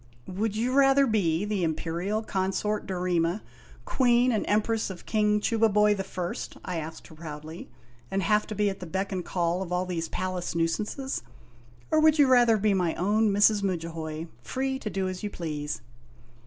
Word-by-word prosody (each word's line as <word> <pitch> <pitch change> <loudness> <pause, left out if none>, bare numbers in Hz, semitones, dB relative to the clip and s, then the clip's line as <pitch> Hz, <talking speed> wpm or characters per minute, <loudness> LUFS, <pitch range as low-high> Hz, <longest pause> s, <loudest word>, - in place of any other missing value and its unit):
"Would 205 +3 -2
you 235 +3 0
rather 275 0 +5
be 200 -6 +1
the 205 -3 -1
Imperial 170 +6 -1
Consort 200 +1 -1
Dorema, 180 0 0 0.4
Ouee 245 -2 +3
n 255 - +3
and 220 - 0
Empress 215 +1 +1
of 185 -2 -9
King 210 -1 +2
Chubaiboy 210 -2 +3
the 195 - -3
First," 180 -2 -5
I 180 -2 -3
asked 160 0 -6
her - - -13
proudly, 155 +1 -8 0.4
"and 195 0 -1
have 210 +3 +2
to 215 - -5
be 210 0 +2
at 195 -1 -2
the 180 - -7
beck 190 +4 -2
and 185 -2 -2
call 175 0 -1
of 180 -2 -5
all 180 +1 0
these 170 -3 -3
palace 185 -2 -3
nuisances, 210 - -1 0.7
or 315 - +4
would 310 0 +5
you 290 - +6
rather 240 -4 +5
be 210 0 +2
my 180 -4 +1
own 210 +4 +2
Mrs. 205 +1 +4
Mudjahoy, 165 -4 -3 0.2
free 265 - -2
to 215 - -4
do 195 -2 -1
as 185 -1 -5
you 210 - -3
please 150 -5 -4
195 Hz, 180 wpm, -27 LUFS, 175-215 Hz, 0.7 s, you